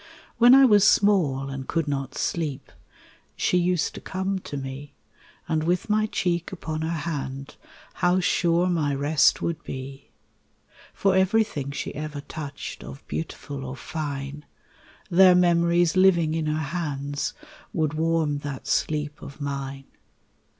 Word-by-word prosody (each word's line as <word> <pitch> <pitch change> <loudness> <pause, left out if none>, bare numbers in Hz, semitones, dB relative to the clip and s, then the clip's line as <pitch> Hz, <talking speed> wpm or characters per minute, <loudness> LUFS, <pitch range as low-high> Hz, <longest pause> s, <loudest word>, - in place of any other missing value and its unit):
When 240 +2 +8
I 270 0 +8
was 210 -5 +5
small 175 -11 +3
and 135 -1 -6
could 165 -2 -1
not 135 -2 -3
sleep, 145 -5 -3 0.6
She 180 - +1
used 175 -1 +1
to - - -9
come 190 +1 -2
to 145 - -7
me, 135 +1 -7 0.5
And 155 -1 0
with 175 +5 0
my 215 0 +2
cheek 175 -4 -1
upon 160 -4 -4
her 160 - -2
hand 140 -4 -4 0.5
How 180 +1 +3
sure 175 -1 +2
my 155 -6 0
rest 145 +2 +3
would 170 -2 -2
be. 135 +1 -8 0.8
For 195 -1 +1
everything 190 -7 +1
she 140 - -4
ever 150 0 -5
touched 145 -1 -7
Of 135 - -11
beautiful 145 -3 -5
or 130 0 -6
fine, 145 -1 -5 0.7
Their 185 +1 +7
memories 170 -1 +3
living 175 -4 +4
in 160 -1 -1
her 155 0 -2
hands 145 -2 -3 0.4
Would 155 -7 0
warm 160 -2 0
that 145 -2 -6
sleep 150 -1 -1
of 140 +1 -10
mine. 140 -1 -5
155 Hz, 140 wpm, -25 LUFS, 140-175 Hz, 0.8 s, When